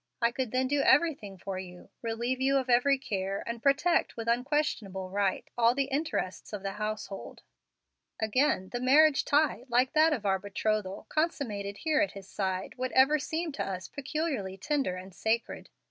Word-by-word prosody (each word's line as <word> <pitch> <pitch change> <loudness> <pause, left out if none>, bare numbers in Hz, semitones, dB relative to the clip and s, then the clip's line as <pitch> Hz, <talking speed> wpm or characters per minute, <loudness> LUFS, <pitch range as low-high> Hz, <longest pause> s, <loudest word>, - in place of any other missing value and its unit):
I 235 0 +3
could 255 0 -2
then 255 +3 +1
do 285 +1 +1
everything 275 - +2
for 190 +1 -5
you, 180 -1 -10
relieve 235 +3 -2
you 275 +1 +3
of 260 -2 0
every 270 +3 +4
care, 195 -6 -3
and 235 0 -5
protect 285 +5 +2
with 230 0 -5
unquestionable 235 -7 -1
right 200 -1 0
all 235 0 +4
the 275 - +2
interests 275 - -2
of 200 -2 -5
the 195 - -2
household. 210 -1 -5 0.8
Again, 220 -3 +1
the 245 - -3
marriage 280 +3 +5
tie, 290 -4 +2
like 250 +2 +2
that 315 +1 +5
of 240 -9 -2
our 190 -1 +2
betrothal, 205 0 -2
consummated 215 -11 -2
here 310 -1 +1
at 305 - 0
his 195 -2 -10
side, 190 -1 -3
would 255 0 -2
ever 270 +4 +5
seem 320 +4 -3
to 275 - -3
us 185 -2 -5
peculiarly 285 - -3
tender 285 -8 -1
and 185 +1 -9
sacred. 225 +5 -2
240 Hz, 175 wpm, -29 LUFS, 195-280 Hz, 0.8 s, marriage